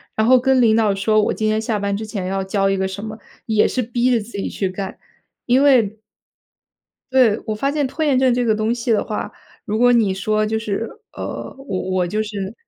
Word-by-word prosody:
然 220 - +2
后 255 +1 +6
跟 260 0 +3
领 220 -2 +4
导 220 -3 +3
说， 215 +2 +2
我 - - 0
今 215 - -1
天 215 0 +1
下 220 -2 -1
班 200 0 -1
之 220 +2 -4
前 205 -3 -5
要 195 +1 -1
交 195 +1 0
一 195 - +1
个 190 0 0
什 190 +2 -7
么， 220 0 -6 0.3
也 215 -2 +3
是 255 - -1
逼 240 +2 0
着 235 - +3
自 220 +2 -10
己 200 - -3
去 195 - -2
干， 190 +1 -6 0.5
因 255 +3 +3
为 230 -7 +3 1.1
对， 240 -5 +4
我 215 -2 -2
发 275 +6 -1
现 290 -2 0
拖 315 +4 -3
延 280 -4 +3
症 260 -2 +3
这 245 0 +1
个 225 -2 +2
东 215 +2 0
西 240 0 -2
的 215 - +3
话， - - -4 0.3
如 215 -2 -2
果 245 +1 +5
你 220 -5 +3
说 215 +3 0
就 220 +1 -1
是 220 +1 -3 0.2
呃， - - -6
我 270 -9 -4
我 185 -1 +1
就 210 +5 -1
是 205 -2 -5
220 Hz, 250 characters per minute, -20 LUFS, 200-245 Hz, 1.1 s, 后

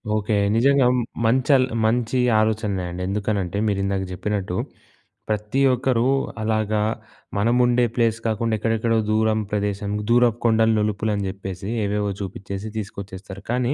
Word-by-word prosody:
Okay. 105 +1 -1 0.2
నిజంగా 135 +2 +4
మ్ 125 - +1 0.2
మంచల్ 130 +3 +4 0.2
మంచి 120 +2 +1 0.2
ఆలోచనలే 105 -3 0
అండి. 90 +1 -6
ఎందుకనంటే, 100 -2 -1
మీరు 100 -1 0
ఇందాక 100 -1 -1
జెప్పినట్టు, 95 -1 -2 0.7
ప్రతి 105 +5 -1
ఒక్కరు 125 -1 +1 0.4
అలాగా 110 -1 0 0.6
మనముండే 120 +2 +3
ప్లేస్ 115 -2 +1
కాకుండా 110 +1 0
ఎక్కడెక్కడో 115 +1 +1
దూరం 110 0 +2
ప్రదేశం, 100 0 -2 0.2
దూరపు 120 -1 +4
కొండలు, 110 0 +4
నులుపులు 105 0 0
అని 100 - -2
జెప్పేసి 95 0 -6 0.2
ఏవేవో 105 0 -1
చూపిచ్చేసి 100 +2 -6
తీసుకొచ్చేస్తారు. 100 -1 -7
కానీ 125 +2 +1
110 Hz, 125 wpm, -22 LUFS, 100-115 Hz, 0.7 s, నిజంగా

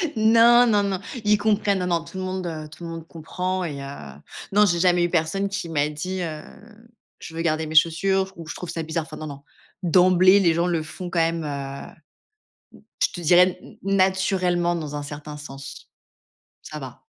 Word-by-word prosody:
Non, 230 +2 +6
non, 210 -2 +3
non, 195 -2 -1 0.3
ils 210 0 +4
comprennent, 205 -2 +1
non, 180 - -2
non, 170 -2 0
tout 190 - -10
le 185 - -3
monde, 185 -1 -3
heu, 155 -2 -6
tout 165 - -13
le 170 - -5
monde 165 0 -8
comprend, 180 +3 -3
et 145 -5 -5
heu, - - -6 0.7
non, 210 +1 +5
j'ai 175 -3 +1
jamais 175 -1 +3
eu 175 - +1
personne 180 +4 0
qui 195 -3 -4
m'a 150 -2 0
dit: 180 +5 -4
«Heu, 155 -3 -4 0.8
je 160 - -10
veux 165 - -2
garder 160 -1 0
mes 155 - -6
chaussures» 190 +4 +3
ou 165 - -9
«Je - - -6
trouve 180 - -7
ça 165 -1 -3
bizarre». 160 +1 -2
Enfin, 155 - -10
non, 155 - -6
non, 140 -1 -9 0.4
d'emblée, 185 +2 +5
les 170 -4 +3
gens 170 +2 +1
le 170 -3 0
font 175 +3 -7
quand 170 - -1
même, 165 0 +1
heu, 140 -2 -6 1.1
je - - +2
te 175 - -7
dirais 180 +2 +4 0.2
na 195 -1 +3
naturellement, 180 -2 0
dans 150 -3 -5
un 145 - -4
certain 150 +1 -8
sens, 140 -2 -10 0.7
ça - - -8
va. - - -10
175 Hz, 205 wpm, -23 LUFS, 160-190 Hz, 1.1 s, Non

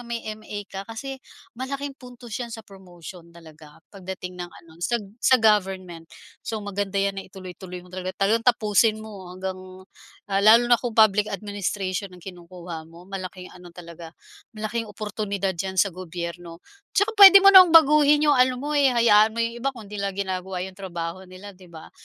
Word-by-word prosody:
may 235 -1 -5
MA 210 -1 -8
ka 195 - -6
kasi 265 +4 -7 0.4
malaking 275 +2 -5
puntos 245 -2 -13
yan 245 -2 -5
sa 225 - -9
promotion 180 -3 -13
talaga 160 -2 -16
pagdating 185 -2 -8
ng 175 - -5
ano 165 -1 -18
sag 235 +4 -1 0.2
sa 260 - +5
government. 190 -6 0 0.3
So 220 -2 -5
maganda 200 0 -4
'yan 195 0 0
na - - -12
ituloy-tuloy 185 -1 -10
mo 180 - -19
talaga 185 0 -5
talagang 225 +4 0
tapusin 215 -2 +2
mo 200 -4 -10
hanggang, 185 0 -5 0.7
ah, 195 - +1
lalo 230 +4 +5
na 240 - +6
kung 240 -3 -5
Public 215 -1 +4
Administration 200 -2 -4
ang 180 - -16
kinukuha 175 -3 -10
mo. 165 +1 -15
Malaking 185 -1 -8
ano 180 -1 -15
talaga, 170 -1 -11 0.4
malaking 220 +1 -4
oportunidad 205 -2 -4
diyan 190 +1 -5
sa 190 +1 +2
gobyerno. 170 -1 -8 0.3
Tsaka 410 +2 +2
puwede 395 0 +10
mo 395 - +8
namang 370 -4 +8
baguhin 300 -1 +6
'yong 290 -3 +3
ano 255 0 +4
mo, 285 +4 -6
eh, 285 -2 +3
hayaan 220 -2 +4
mo 230 - -1
'yong 230 +1 -3
iba 270 +2 -2
kung 215 -4 -12
'di 210 - -7
nila 200 -1 -3
ginagawa 190 -1 -4
'yong 190 +1 -9
trabaho 180 0 -6
nila, 185 +3 -11
'di 185 -2 -17
ba. 160 -2 -13
195 Hz, 180 wpm, -23 LUFS, 180-230 Hz, 0.7 s, puwede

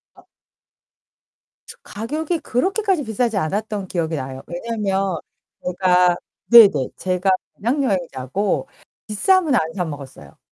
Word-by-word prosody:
아. - - -20 1.4
저 - - -12
가격이 305 +10 -3
그렇게까지 380 - 0
비싸지 225 -1 -1
않았던 200 +3 -2
기억이 165 -3 -2
나요. 130 -2 -5
왜냐면 195 -1 -2 0.5
제가 180 -1 +3 0.4
네네. 200 - +8
제가 185 +1 0 0.2
배낭 255 +7 0
여행자고 180 - -1 0.4
비싸면 315 - +2
안 160 -6 0
사 185 - -1
먹었어요. 135 - -10
195 Hz, 255 characters per minute, -21 LUFS, 170-235 Hz, 1.4 s, 네네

